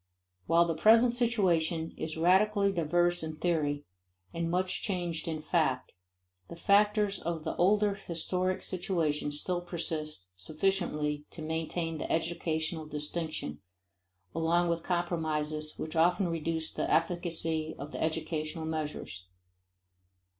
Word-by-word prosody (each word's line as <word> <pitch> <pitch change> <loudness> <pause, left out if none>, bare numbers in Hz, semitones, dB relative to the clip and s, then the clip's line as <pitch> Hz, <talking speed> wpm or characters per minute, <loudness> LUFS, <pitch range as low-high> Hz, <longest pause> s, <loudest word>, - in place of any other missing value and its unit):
While 170 +1 +5
the 165 - 0
present 225 +8 +6
situation 175 -9 +2
is 160 0 -4
radically 200 +4 +4
diverse 175 0 +2
in 160 -1 -4
theory 150 -4 0 0.5
and 165 0 -1
much 185 +2 0
changed 175 -5 -2
in 155 -2 -3
fact, 145 -8 +1 0.6
the - - -7
factors 205 +2 +3
of 165 -1 -3
the - - -3
older 205 +3 +4
historic 185 0 -2
situation 165 -6 -1
still 175 +4 -1
persist 160 - -3
sufficiently 150 - -1
to 160 - -8
maintain 160 +1 -2
the - - -3
educational 160 -1 -1
distinction, 150 - -3 0.7
along 170 +2 +2
with 170 0 0
compromises 155 -3 -1
which 155 - -5
often 175 +3 +3
reduce 160 -1 -2
the - - -2
efficacy 165 -2 +1
of 145 +2 -7
the - - -5
educational 160 0 -2
measures. 150 - -4
165 Hz, 120 wpm, -31 LUFS, 155-180 Hz, 0.7 s, present